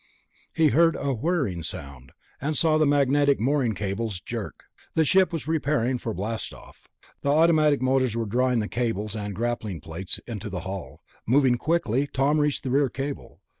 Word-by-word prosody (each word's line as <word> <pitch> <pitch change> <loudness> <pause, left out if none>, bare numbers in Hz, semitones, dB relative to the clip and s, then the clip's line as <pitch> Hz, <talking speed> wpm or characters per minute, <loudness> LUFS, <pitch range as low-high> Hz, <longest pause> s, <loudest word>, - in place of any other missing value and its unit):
He 160 -2 +4
heard 165 +2 +4
a 140 -1 -1
whirring 130 - -1
sound, 70 -5 -8 0.3
and 150 +1 -1
saw 155 -1 +3
the 155 - +4
magnetic 145 0 +3
mooring 125 -2 +1
cables 100 0 -3
jerk. - - -6 0.3
The 160 - +3
ship 190 +4 +4
was 165 -3 -3
preparing 140 -5 0
for 115 - -4
blastoff. 110 +3 -6 0.4
Automatic 150 -1 +4
motors 130 -3 +1
were 115 - -1
drawing 125 +3 +1
the 105 - -3
cables 110 -3 -2
and 105 -2 -4
grappling 110 -5 -2
plates 85 +4 -5
into 105 -3 -6
the 95 -2 -4
hull. 95 -1 -7 0.2
Moving 130 +1 +4
quickly, 140 -2 0
Tom 140 +3 +1
reached 150 -1 0
the 130 - -3
rear 140 0 +3
cable. 140 +3 -6
130 Hz, 165 wpm, -25 LUFS, 105-145 Hz, 0.4 s, He